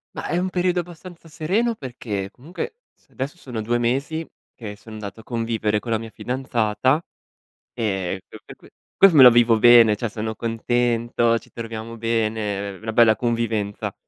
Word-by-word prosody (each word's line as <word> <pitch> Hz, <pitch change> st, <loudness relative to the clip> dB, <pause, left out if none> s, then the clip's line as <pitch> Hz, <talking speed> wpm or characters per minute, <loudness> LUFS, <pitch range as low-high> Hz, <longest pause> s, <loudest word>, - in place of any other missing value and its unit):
Mah, -, -, -5 dB
è 175 Hz, -, 0 dB
un 185 Hz, +1 st, -1 dB
periodo 180 Hz, 0 st, 0 dB
abbastanza 175 Hz, 0 st, -9 dB
sereno 195 Hz, +10 st, -1 dB
perché 110 Hz, -, -5 dB
comunque 170 Hz, -, -7 dB, 0.2 s
s -, -, -31 dB
adesso 140 Hz, +6 st, -5 dB
sono 120 Hz, -8 st, -6 dB
2 120 Hz, +3 st, 0 dB
mesi 140 Hz, +7 st, -1 dB, 0.3 s
che 105 Hz, -3 st, -8 dB
son 110 Hz, +1 st, -13 dB
andato 105 Hz, 0 st, -8 dB
a -, -, -12 dB
convivere 115 Hz, -3 st, -1 dB
con 115 Hz, +3 st, -6 dB
la 110 Hz, -, +1 dB
mia 115 Hz, 0 st, -8 dB
fidanzata 125 Hz, +2 st, 0 dB, 0.7 s
e 95 Hz, -4 st, -2 dB
per -, -, -13 dB
q -, -, -41 dB
que -, -, -11 dB
que -, -, -18 dB, 0.3 s
questo 195 Hz, -4 st, +7 dB
me 135 Hz, -, +9 dB
lo 125 Hz, -, +10 dB
vivo 115 Hz, -1 st, +4 dB
bene, 120 Hz, -2 st, +7 dB
cioè 115 Hz, +2 st, -3 dB
sono 110 Hz, +1 st, -4 dB
contento, 115 Hz, 0 st, 0 dB
ci -, -, -21 dB
troviamo 115 Hz, 0 st, -7 dB
bene, 110 Hz, -3 st, -2 dB
ehm, 95 Hz, -, -16 dB
una 110 Hz, -, -4 dB
bella 115 Hz, -2 st, +5 dB
convivenza. 115 Hz, -3 st, -2 dB
115 Hz, 180 wpm, -22 LUFS, 110-130 Hz, 0.7 s, lo